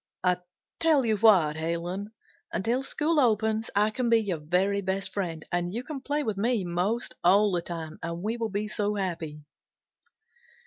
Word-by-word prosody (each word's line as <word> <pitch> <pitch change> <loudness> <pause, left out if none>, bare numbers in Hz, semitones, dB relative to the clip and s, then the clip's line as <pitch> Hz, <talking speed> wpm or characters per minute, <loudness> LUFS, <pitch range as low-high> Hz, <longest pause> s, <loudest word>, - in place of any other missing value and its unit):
"I 180 -1 +3 0.4
tell 310 -6 +4
you 220 -2 +2
what, 185 -8 +5
Helen, 170 +5 -3 0.4
until 235 +7 0
school 300 +3 0
opens 220 -3 +2
I 210 +2 +3
can 240 +1 -1
be 230 - +6
your 200 -7 -1
very 185 +6 +1
best 190 0 -2
friend, 170 -5 -3
and 175 0 0
you 235 +5 -3
can 280 0 -6
play 290 +2 -1
with 215 -6 -2
me 225 0 +1
'most 180 +8 -1
all 200 +3 +5
the 175 -2 0
time, 165 -2 -6
and 170 +2 -4
we 220 +2 -1
will 230 -2 -2
be 205 +1 -2
so 210 0 -1
happy." 165 -6 -4
200 Hz, 175 wpm, -27 LUFS, 175-225 Hz, 0.4 s, be